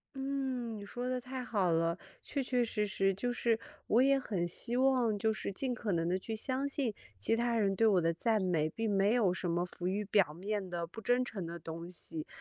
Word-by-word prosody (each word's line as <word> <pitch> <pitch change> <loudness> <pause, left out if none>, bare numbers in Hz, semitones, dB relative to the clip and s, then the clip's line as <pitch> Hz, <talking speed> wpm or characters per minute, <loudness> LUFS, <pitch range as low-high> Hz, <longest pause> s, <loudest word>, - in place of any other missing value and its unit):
嗯， 265 -4 -2
你 205 - -7
说 245 +4 -4
得 255 0 -1
太 255 +1 -5
好 200 -8 +1
了， 165 +1 +2 0.2
确 280 -2 -2
确 250 -1 +1
实 210 -2 -1
实 195 -1 +1
就 245 +6 -2
是 235 -2 +1 0.3
我 230 - +5
也 275 +1 +5
很 195 -9 -1
希 230 +7 0
望 250 -4 +3
就 220 +2 +2
是 215 - -3
尽 255 +5 -1
可 220 -5 -2
能 165 0 +1
地 185 - +1
去 220 +4 -4
相 260 +5 -1
信 270 -6 -1 0.2
其 100 - 0
他 235 0 +1
人 200 -3 +2
对 225 - +5
我 190 -4 +4
的 165 0 +2
赞 215 +5 +1
美， 165 -4 +2
并 225 +5 -2
没 200 +2 +3
有 215 -7 +3
什 180 -1 -3
么 170 +1 +1
浮 180 0 -5
于 200 +3 0
表 195 -6 +3
面 195 +3 -3
的 170 -1 -2
不 175 +7 -10
真 245 +3 +2
诚 205 -7 -5
的 170 +1 -5
东 165 +1 -7
西。 160 -3 -3
215 Hz, 245 characters per minute, -33 LUFS, 180-245 Hz, 0.3 s, 我